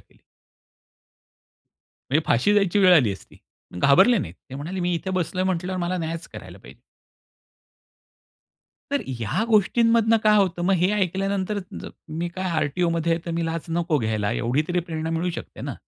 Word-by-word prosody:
केली. -, -, -28 dB, 1.9 s
म्हणजे 155 Hz, +3 st, +2 dB
फाशी 205 Hz, -, +3 dB
जायची 200 Hz, -1 st, +2 dB
वेळ 185 Hz, -2 st, +6 dB
आली 120 Hz, -11 st, +4 dB
असती. 95 Hz, -, -13 dB, 0.4 s
घाबरले 190 Hz, -, +5 dB
नाहीत. 85 Hz, +1 st, -5 dB, 0.2 s
ते 130 Hz, -, -7 dB
म्हणाले 170 Hz, +7 st, -5 dB
मी 175 Hz, 0 st, 0 dB
इथे 190 Hz, +3 st, -4 dB
बसलोय 185 Hz, 0 st, -1 dB
म्हटल्यावर 185 Hz, 0 st, -2 dB
मला 175 Hz, +1 st, -1 dB
न्यायच 165 Hz, 0 st, -4 dB
करायला -, -, -10 dB
पाहिजे. -, -, -16 dB, 2.1 s
तर 285 Hz, -, +1 dB
ह्या 120 Hz, -, -2 dB
गोष्टींमधनं 230 Hz, +1 st, +3 dB
काय 210 Hz, 0 st, +5 dB
होतं, 185 Hz, -3 st, +1 dB
मग 190 Hz, +2 st, +2 dB
हे 180 Hz, +3 st, +2 dB
ऐकल्यानंतर 195 Hz, +1 st, -1 dB, 0.2 s
ज -, -, -7 dB, 0.3 s
मी 175 Hz, +1 st, -2 dB
काय 185 Hz, +1 st, -4 dB
आर-टी-ओमध्ये 165 Hz, +2 st, 0 dB
आहे 165 Hz, -, -1 dB
तर 170 Hz, -, -3 dB
मी 170 Hz, -, -1 dB
लाच 165 Hz, 0 st, -3 dB
नको 165 Hz, -2 st, 0 dB
घ्यायला 110 Hz, -3 st, -1 dB
एवढी 125 Hz, +5 st, 0 dB
तरी 175 Hz, 0 st, +1 dB
प्रेरणा 160 Hz, 0 st, -3 dB
मिळू 170 Hz, +2 st, -1 dB
शकते -, -, -8 dB
ना? -, -, -5 dB
175 Hz, 160 wpm, -23 LUFS, 160-190 Hz, 2.1 s, वेळ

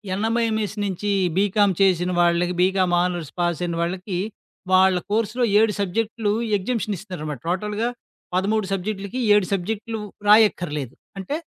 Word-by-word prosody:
NMMS 220 Hz, 0 st, 0 dB
నుంచి 200 Hz, +1 st, -2 dB, 0.3 s
BCom 205 Hz, 0 st, +3 dB
చేసిన 180 Hz, -2 st, +3 dB
వాళ్ళకి 175 Hz, +1 st, +2 dB
బీకామ్ 185 Hz, -1 st, +2 dB
ఆనర్స్ 175 Hz, -4 st, -3 dB
పాస్ 175 Hz, -1 st, 0 dB
అయిన 170 Hz, -1 st, -2 dB
వాళ్ళకి, 180 Hz, +2 st, -3 dB, 0.6 s
వాళ్ళ 190 Hz, 0 st, +5 dB, 0.2 s
కోర్స్‌లో 225 Hz, +3 st, 0 dB, 0.2 s
7 220 Hz, -1 st, +3 dB
సబ్జెక్టులు 210 Hz, +2 st, -1 dB, 0.3 s
ఎగ్జామషన్ 215 Hz, 0 st, -2 dB
ఇస్తున్నారనమాట. 155 Hz, -, -6 dB
టోటల్‌గా 210 Hz, +5 st, -1 dB, 0.5 s
13 205 Hz, +3 st, +1 dB
సబ్జెక్టులకి, 200 Hz, +4 st, -3 dB
7 205 Hz, -2 st, +4 dB
సబ్జెక్టులు 220 Hz, +4 st, -3 dB, 0.3 s
రాయక్కర్లేదు. 175 Hz, -, +3 dB, 0.2 s
అంటే 195 Hz, +10 st, -3 dB
195 Hz, 120 wpm, -23 LUFS, 180-215 Hz, 0.6 s, వాళ్ళ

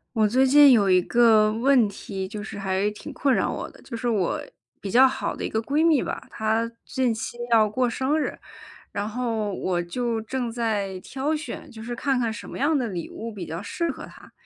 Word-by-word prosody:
我 215 Hz, -1 st, +4 dB
最 255 Hz, +5 st, +3 dB
近 285 Hz, +1 st, +8 dB
有 200 Hz, -5 st, +4 dB
一 185 Hz, -, +5 dB
个 220 Hz, 0 st, +4 dB
问 240 Hz, 0 st, +3 dB
题， 195 Hz, -1 st, -6 dB
就 210 Hz, 0 st, -6 dB
是 205 Hz, -, -7 dB
还 195 Hz, +1 st, 0 dB
挺 210 Hz, -, -9 dB
困 275 Hz, -2 st, +1 dB
扰 -, -, +1 dB
我 -, -, -4 dB
的， -, -, -18 dB
就 230 Hz, -3 st, -7 dB
是 240 Hz, -, -3 dB
我 205 Hz, -7 st, 0 dB, 0.4 s
比 195 Hz, -, -5 dB
较 260 Hz, +3 st, +7 dB
好 265 Hz, -, -3 dB
的 -, -, -6 dB
一 -, -, -2 dB
个 220 Hz, -, 0 dB
闺 285 Hz, +7 st, 0 dB
蜜 320 Hz, -5 st, +4 dB
吧， -, -, -5 dB
她 225 Hz, +1 st, -1 dB
近 255 Hz, -2 st, 0 dB
期 220 Hz, +1 st, -4 dB
要 225 Hz, -2 st, +5 dB
过 245 Hz, +4 st, 0 dB
生 265 Hz, +6 st, 0 dB
日。 -, -, -3 dB, 0.5 s
然 205 Hz, +1 st, -3 dB
后 225 Hz, -3 st, -2 dB
我 180 Hz, -2 st, -1 dB
就 230 Hz, +6 st, -2 dB
正 240 Hz, +1 st, -3 dB
在 210 Hz, -5 st, -2 dB
挑 275 Hz, +9 st, -2 dB
选， 310 Hz, +1 st, -7 dB
就 220 Hz, -, -10 dB
是 240 Hz, +2 st, -5 dB
看 270 Hz, +1 st, 0 dB
看 230 Hz, -2 st, 0 dB
什 230 Hz, +1 st, -8 dB
么 -, -, -7 dB
样 300 Hz, +2 st, +2 dB
的 255 Hz, -, 0 dB
礼 175 Hz, -4 st, -5 dB
物 230 Hz, +1 st, -7 dB
比 190 Hz, -4 st, -7 dB
较 165 Hz, +2 st, -4 dB
适 335 Hz, -, -3 dB
合 280 Hz, -, -6 dB
她。 -, -, -15 dB
230 Hz, 240 characters per minute, -25 LUFS, 210-260 Hz, 0.5 s, 近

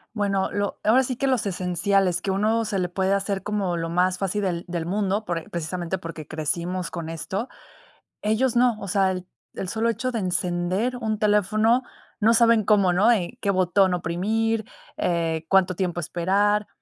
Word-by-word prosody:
Bueno, 195 Hz, -2 st, 0 dB
lo 205 Hz, -1 st, -2 dB
ahora 240 Hz, +5 st, +4 dB
sí 255 Hz, 0 st, -3 dB
que 275 Hz, +3 st, -1 dB
los 255 Hz, -5 st, +1 dB
esenciales 180 Hz, 0 st, +1 dB
que 195 Hz, -, -1 dB
a -, -, 0 dB
uno 220 Hz, +3 st, +1 dB
se 205 Hz, -3 st, -1 dB
le 180 Hz, -1 st, -1 dB
puede 190 Hz, +1 st, 0 dB
hacer 200 Hz, 0 st, -1 dB
como 200 Hz, -4 st, -1 dB
lo 165 Hz, 0 st, -3 dB
más 180 Hz, +2 st, +1 dB
fácil 195 Hz, +1 st, -1 dB
del 180 Hz, -3 st, -2 dB
del 170 Hz, -2 st, -3 dB
mundo, 200 Hz, +3 st, -1 dB
por 165 Hz, -3 st, -4 dB
precisamente 175 Hz, +2 st, -3 dB
porque 165 Hz, -3 st, -8 dB
crecimos 170 Hz, +4 st, -2 dB
con 165 Hz, -2 st, -6 dB
esto, 190 Hz, -, -4 dB, 0.7 s
ellos 225 Hz, +4 st, +1 dB
no. 245 Hz, -2 st, +4 dB
O 200 Hz, -, -6 dB
sea, 190 Hz, 0 st, +2 dB
el 185 Hz, -1 st, -6 dB, 0.3 s
el 190 Hz, -, -5 dB
solo 225 Hz, +4 st, 0 dB
hecho 240 Hz, +3 st, -1 dB
de 230 Hz, -, -1 dB
encender 180 Hz, +6 st, -1 dB
un 220 Hz, -3 st, -2 dB
teléfono, 215 Hz, +3 st, +3 dB, 0.4 s
no 225 Hz, +3 st, +4 dB
saben 230 Hz, -2 st, +4 dB
cómo, 200 Hz, -3 st, +4 dB
¿no? 205 Hz, +6 st, +4 dB
Eh, 225 Hz, 0 st, 0 dB
qué 200 Hz, -, 0 dB
botón 185 Hz, 0 st, +3 dB
oprimir, 215 Hz, +6 st, -1 dB, 0.3 s
eh, 165 Hz, -2 st, -1 dB
cuánto 190 Hz, -1 st, +3 dB
tiempo 175 Hz, -1 st, -2 dB
esperar. 195 Hz, +5 st, +1 dB
195 Hz, 180 wpm, -24 LUFS, 175-215 Hz, 0.7 s, ahora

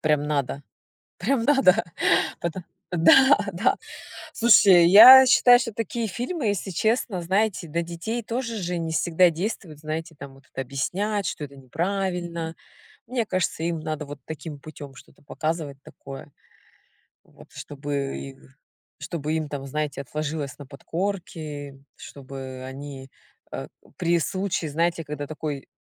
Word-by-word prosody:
Прям 150 Hz, -2 st, +1 dB
надо, 140 Hz, -1 st, -2 dB, 0.6 s
прям 230 Hz, +5 st, 0 dB
надо. 230 Hz, -8 st, +4 dB, 0.6 s
Потом 170 Hz, +1 st, -4 dB, 0.3 s
да, 225 Hz, -, +6 dB
да. 195 Hz, +8 st, +1 dB, 0.6 s
Слушай, 195 Hz, -7 st, +6 dB
я 250 Hz, +8 st, +11 dB
считаю, 245 Hz, -1 st, +7 dB
что 230 Hz, -3 st, -4 dB
такие 230 Hz, +1 st, -3 dB
фильмы, 250 Hz, -, -4 dB
если 200 Hz, -1 st, -1 dB
честно, 215 Hz, 0 st, 0 dB
знаете, 190 Hz, 0 st, 0 dB
до 170 Hz, +2 st, -1 dB
детей 170 Hz, +8 st, -4 dB
тоже 235 Hz, +1 st, -3 dB
же 180 Hz, -2 st, -3 dB
не 165 Hz, -1 st, -3 dB
всегда 170 Hz, +3 st, +3 dB
действуют, 170 Hz, -3 st, -5 dB
знаете, 155 Hz, +2 st, -5 dB
там 140 Hz, -1 st, -10 dB
вот 135 Hz, -, -19 dB
объяснять, 185 Hz, -, -2 dB
что -, -, -4 dB
это 140 Hz, -, -14 dB
неправильно. 170 Hz, +3 st, -3 dB, 0.5 s
Мне 240 Hz, -2 st, -2 dB
кажется, 185 Hz, -4 st, -1 dB
им 170 Hz, -1 st, -2 dB
надо 155 Hz, -1 st, -4 dB
вот 145 Hz, 0 st, -9 dB
таким 155 Hz, -1 st, -7 dB
путём 145 Hz, -2 st, -11 dB
что-то -, -, -17 dB
показывать 155 Hz, -1 st, -4 dB
такое. 135 Hz, +1 st, -11 dB, 0.9 s
Вот, -, -, -18 dB
чтобы 140 Hz, -1 st, -5 dB, 0.6 s
чтобы 155 Hz, -2 st, -4 dB
им 155 Hz, -2 st, -2 dB
там, 140 Hz, -1 st, -6 dB
знаете, 145 Hz, 0 st, -3 dB
отложилось 150 Hz, 0 st, -4 dB
на 145 Hz, -, -10 dB
подкорке, 155 Hz, -2 st, -5 dB, 0.2 s
чтобы 130 Hz, -1 st, -9 dB
они, 135 Hz, 0 st, -9 dB, 0.4 s
э, 65 Hz, 0 st, -5 dB, 0.3 s
при 170 Hz, -1 st, +2 dB
случае, 185 Hz, -3 st, -2 dB
знаете, 165 Hz, +2 st, 0 dB
когда 145 Hz, -1 st, -6 dB
такой 150 Hz, -2 st, -5 dB
165 Hz, 130 wpm, -24 LUFS, 145-195 Hz, 0.9 s, я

